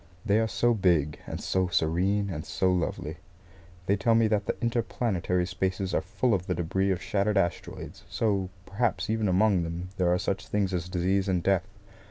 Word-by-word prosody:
They 105 0 +3
are 110 - +2
so 110 +4 +2
big, 85 -8 +2
and - - -4
so 95 -1 0
serene 95 +5 +1
and 80 -3 -4
so 95 0 +1
lovely. 90 -3 -2 0.7
They 100 - +3
tell 110 +4 +2
me 115 -1 +4
that 105 -2 0
the - - -2
interplanetary 110 -6 0
spaces 95 +1 -2
are - - +2
full 115 +6 0
of 90 -2 -1
the 90 - 0
debris 95 +3 0
of 95 -3 +1
shattered 105 +1 +1
asteroids; 85 - -2
so, 100 -4 0 0.2
perhaps, 100 -1 -1
even 110 -1 +1
among 95 0 +3
them 85 +2 -4
there 90 -2 +2
are 90 - +3
such 95 +1 -2
things 100 -2 0
as 90 -1 -2
disease 95 +2 +1
and 90 -3 +1
death. 95 -1 +2
95 Hz, 190 wpm, -28 LUFS, 90-105 Hz, 0.7 s, me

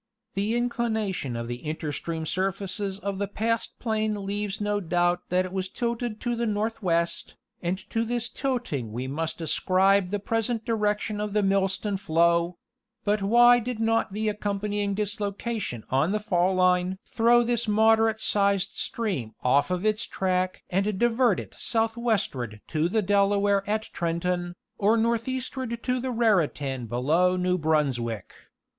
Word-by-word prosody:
The 205 +4 0
inclination 220 - -1
of 115 0 -4
the 120 +1 -5
interstream 160 +1 -4
surfaces 195 +2 -2
of 200 -1 -4
the 200 - -1
past 225 +3 -2
plain 215 -3 -1
leaves 205 +1 -3
no 205 0 0
doubt 175 -1 0
that 185 +1 +2
it 185 - -7
was 190 -1 -2
tilted 235 0 -3
to 240 -1 -1
the 235 0 -1
northwest, 205 -6 -1 0.3
and 175 +2 -1
to 225 - +1
this 240 0 -1
tilting 240 - -3
we 120 +4 -4
must 160 +5 -3
ascribe 185 +4 +2
the 205 - -1
present 225 +2 -1
direction 210 -1 0
of 210 -1 -3
the 210 -1 +2
Millstone 195 +1 +1
flow: 170 -1 +2 0.5
but 205 0 +2
why 240 +4 +6
did 240 -1 -4
not 225 -2 +1
the 215 +2 -2
accompanying 205 -1 -1
dislocation 205 - -3
on 140 +9 +2
the 215 - +1
fall 185 -3 +1
line 185 0 +2
throw 240 +1 +4
this 235 -1 0
moderate 220 +1 +4
sized 200 -2 +2
stream 180 - -3
off 140 +5 +3
of 180 +2 -1
its 215 0 +1
track 185 -1 -1
and 195 +2 +1
divert 240 -1 +3
it - - -8
southwestward 220 - -1
to 155 +1 +1
the 220 +2 +1
Delaware 200 0 +3
at 215 +1 +1
Trenton, 175 +1 -1 0.2
or 215 +3 +4
northeastward 235 +1 -2
to 250 0 0
the 260 +1 -3
Raritan 155 - +1
below 155 +11 +2
New 180 0 +1
Brunswick. 130 - 0
200 Hz, 150 wpm, -26 LUFS, 175-225 Hz, 0.5 s, why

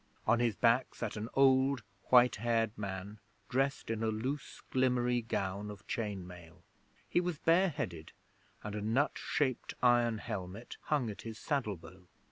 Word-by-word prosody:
On 120 - +4
his 120 -4 +2
back 120 +3 +3
sat - - -4
an 110 +2 -4
old, 135 -2 +4 0.2
white 125 -2 +6
haired 115 -1 +1
man 100 +1 -5 0.3
dressed 135 -1 0
in 115 -1 -2
a 115 - +1
loose 125 +7 -3
glimmery 125 -1 +2
gown 100 -2 -2
of 105 0 -10
chain 105 -5 -3
mail. 90 -1 -13 0.4
He 175 - +2
was 175 -3 -2
bare 175 +5 +4
headed, 90 - -5 0.5
and 105 - -5
a 105 - -3
nut 115 +8 +2
shaped 130 -5 -1
iron 120 -2 +4
helmet 100 +2 -6
hung 135 -7 +1
at 100 - -9
his 115 -1 -7
saddle 125 - -1
bow. 90 +3 -15
115 Hz, 160 wpm, -33 LUFS, 100-130 Hz, 0.5 s, white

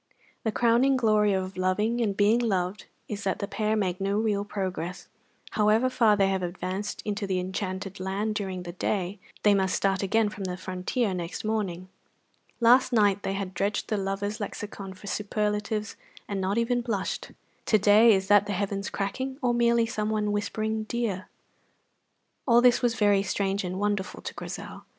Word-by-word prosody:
The 220 - 0
crowning 240 +4 +3
glory 215 -3 +3
of 190 0 -3
loving 210 +6 +1
and 200 -4 0
being 210 +3 +4
loved 195 -4 -1 0.2
is 205 -1 -5
that 190 - 0
the 200 - -3
pair 215 +1 0
make 190 -3 -1
no 200 +1 0
real 210 -2 +1
progress; 185 -3 -4 0.4
however 220 +4 +3
far 225 -5 +4
they 195 -1 +4
have 190 -1 0
advanced 185 +3 -4
into 205 -1 -2
the 185 -1 0
enchanted 190 +1 -4
land 195 +3 -2
during 190 -4 -3
the 175 - -6
day, 185 +2 -2 0.2
they 210 - +6
must 190 -2 +1
start 195 -1 +1
again 210 +2 +2
from 205 -2 -6
the 180 -1 -3
frontier 185 +4 -2
next 175 +3 -5
morning. 195 -5 -2 0.7
Last 255 +2 +5
night 205 -4 +3
they 195 - -2
had 195 -1 -4
dredged 200 +4 -1
the 215 - 0
lovers' 200 +2 -2
lexicon 200 -2 -6
for 185 - -14
superlatives 210 +1 -2 0.3
and 200 -2 -2
not 190 +3 0
even 240 +1 +1
blushed; 215 -5 -3 0.4
to 215 - +5
day 210 +3 +6
is 190 0 -1
that 205 0 +5
the 205 - -1
heavens 200 +1 -2
cracking 260 +7 -3
or 245 -1 +3
merely 235 -1 +3
someone 215 -1 -1
whispering 215 +1 -1
"dear"? 215 -5 -3 1.2
All 235 -1 +6
this 245 0 +5
was 240 -2 +1
very 205 -2 +3
strange 195 0 -1
and 180 0 -3
wonderful 205 0 -2
to - - -5
Grizel. - - -7
205 Hz, 175 wpm, -27 LUFS, 190-220 Hz, 1.2 s, they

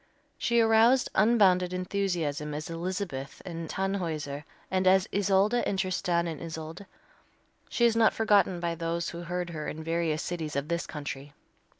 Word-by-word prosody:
She 235 0 +2
aroused 225 +3 +4
unbounded 190 -4 +4
enthusiasm 175 -6 -2
as 155 +2 -5
Elizabeth 170 -5 -4
in 165 -2 -5
"Tannhäuser," 160 -7 -3 0.3
and 185 0 +1
as 190 0 +5
Isolde 205 +4 +3
in 195 - -1
"Tristan 185 -2 0
and 165 -3 -5
Isolde." 160 +3 -7 0.8
She 235 - +2
is 230 -1 +4
not 225 -1 +5
forgotten 205 -4 +3
by 170 -1 -1
those 165 0 -2
who 170 - -7
heard 175 0 -3
her 155 -2 -5
in 160 - -5
various 165 -1 -1
cities 160 -4 -4
of 140 +2 -2
this 170 0 -1
country. 145 -1 -6
175 Hz, 155 wpm, -28 LUFS, 160-195 Hz, 0.8 s, as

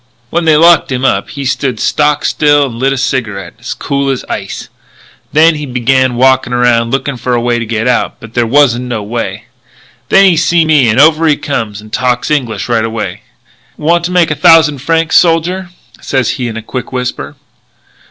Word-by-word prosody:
"When 170 0 -1
they 155 -2 +4
locked 165 -2 +4
him 130 0 -2
up - - 0
he 140 -1 -6
stood 130 -3 -2
stock 150 0 0
still 145 -1 +2
and 115 -3 -7
lit 135 +2 +1
a 135 - -2
cigarette, 105 -8 -3
as - - -6
cool 140 0 -2
as 135 -2 -3
ice. - - -6 0.6
Then 160 +2 +4
he 150 -1 -6
begun 130 0 +1
walkin' 130 0 +2
around 120 -1 +2
looking 135 +1 -2
for 125 0 -2
a - - +1
way 120 0 0
to 115 - -5
get 115 +1 -2
out; 125 - -1
but 115 -1 -13
there 120 -1 0
wasn't 125 -1 +2
no 120 -4 -4
way. 115 +3 -5 0.7
"Then 195 0 +5
he 185 -3 +4
seen 170 0 +2
me 140 -7 +4
and 110 - +1
over 160 +2 +4
he 150 - +2
comes 110 -7 -4
and 110 0 -16
talks 125 +2 -1
English 115 -9 -2
right 115 -2 0
away: 110 -5 -4 0.6
'Want 170 +2 +1
to 180 - -3
make 175 -3 +2
a - - 0
thousand 165 -4 +4
francs, 165 +3 +1
soldier?' 175 +2 +1 0.3
sez 130 -2 -1
he 125 - -4
in 115 -1 -6
a 115 - -7
quick 125 +3 -6
whisper. 125 -1 -4
130 Hz, 200 wpm, -11 LUFS, 120-155 Hz, 0.7 s, Then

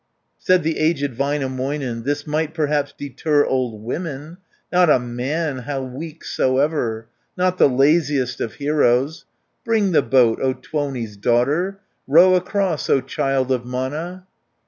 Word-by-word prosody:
Said 185 -2 +3
the 160 +1 -1
aged 145 -4 +1
Väinämöinen, 135 -2 -2
"This 145 +1 -1
might 155 +1 -2
perhaps 145 -2 0
deter 145 +1 0
old 120 -5 -2
women, 150 +4 -5 0.4
Not 180 -2 +5
a - - +6
man, 130 +5 -3
how 135 +1 -4
weak 150 +5 -8
soever. 130 -5 0 0.3
Not 185 0 +1
the - - +6
laziest 140 -1 +2
of 110 - -3
heroes! 145 0 +1 0.4
Bring 220 -5 +1
the 165 - +4
boat, 120 -2 +3
O 130 -1 +1
Tuoni's 130 -8 -4
daughter, 140 - +1 0.3
Row 170 +6 +6
across, 185 -2 0
O 135 - +4
child 135 0 -1
of 125 -2 0
Mana!" 150 +9 -4
145 Hz, 135 wpm, -21 LUFS, 130-160 Hz, 0.4 s, a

